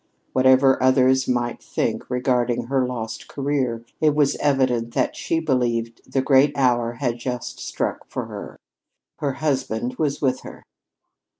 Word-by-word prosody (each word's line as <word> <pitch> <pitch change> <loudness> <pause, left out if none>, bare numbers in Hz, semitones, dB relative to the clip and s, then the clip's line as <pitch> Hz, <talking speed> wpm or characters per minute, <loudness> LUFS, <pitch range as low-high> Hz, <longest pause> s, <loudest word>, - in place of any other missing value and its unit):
Whatever 130 +1 +5
others 130 0 +4
might 120 -1 -1
think - - -2
regarding 125 -1 +1
her 130 0 0
lost 115 -3 -5
career, 135 -5 -2
it 155 -2 +3
was 145 -2 +3
evident 130 -5 +1
that - - +1
she 165 - -1
believed 120 -6 -1
the 135 - +1
great 140 +1 +4
hour 120 -3 +2
had 120 -1 -2
just 125 0 -5
struck - - -3
for - - -4
her. - - -8 0.6
Her 140 -2 -1
husband 130 -4 -2
was 145 -3 0
with 130 -2 +1
her. - - -11
130 Hz, 140 wpm, -23 LUFS, 120-135 Hz, 0.6 s, Whatever